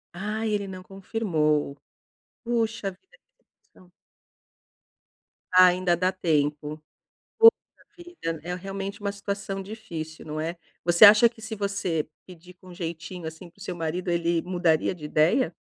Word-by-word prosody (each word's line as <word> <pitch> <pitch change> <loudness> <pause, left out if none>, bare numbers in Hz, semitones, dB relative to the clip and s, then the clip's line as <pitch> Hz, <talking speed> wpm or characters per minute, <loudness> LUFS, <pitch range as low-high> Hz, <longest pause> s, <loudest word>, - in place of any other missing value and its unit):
Ah, 215 +4 -3
ele 205 -2 -1
não 185 -1 -8
confirmou. 170 -8 -1 0.7
Puxa 225 -4 -1
vida, 380 - -24 0.5
então 180 -1 -21 1.6
Ainda 180 -1 +5
dá 185 +2 +1
tempo. 150 -3 -1 0.6
Puxa 455 0 +10 0.5
vida, 345 - -6
é 180 +1 -3
realmente 195 +2 -6
uma 200 0 -1
situação 200 -1 -4
difícil, 180 -7 -8
não 155 0 -5
é? 165 +2 -3 0.3
Você 175 +3 +5
acha 215 +3 +8
que 230 -1 -18
se 220 0 -5
você 195 -6 -2 0.2
pedir 180 0 -14
com 180 0 -14
jeitinho 170 0 -6
assim 160 +2 -9
para 200 - -28
o - - -16
seu 185 -4 -5
marido, 175 +2 -3
ele 170 -1 +1
mudaria 175 -2 +1
de 150 - -9
ideia? 160 - +2
180 Hz, 140 wpm, -26 LUFS, 165-200 Hz, 1.6 s, Puxa